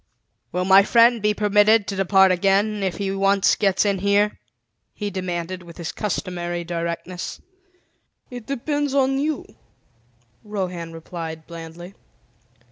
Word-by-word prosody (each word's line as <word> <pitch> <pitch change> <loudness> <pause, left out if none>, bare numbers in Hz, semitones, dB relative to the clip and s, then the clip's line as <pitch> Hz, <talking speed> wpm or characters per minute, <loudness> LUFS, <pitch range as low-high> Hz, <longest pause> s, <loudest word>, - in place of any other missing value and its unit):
"Will 180 0 -1
my 190 +1 +7
friend 235 +2 +4
be 210 0 +1
permitted 210 +1 +4
to 200 - -4
depart 190 0 +4
again, 200 +3 +1
if 190 -2 -2
he 195 -1 -2
once 195 0 +3
gets 195 -1 +1
in 200 -2 +1
here?" 200 +2 +1 0.6
he 205 -1 -4
demanded 185 -1 -4
with 170 -1 -13
his 170 -1 -4
customary 175 -4 -3
directness. 170 +1 -5 0.9
"It 245 -3 -8
depends 285 +1 -2
on 270 0 +2
you," 300 -1 -2 1.0
Rohan 180 -5 -4
replied 165 -1 -7
blandly. 170 +2 -10
195 Hz, 125 wpm, -22 LUFS, 175-210 Hz, 1.0 s, my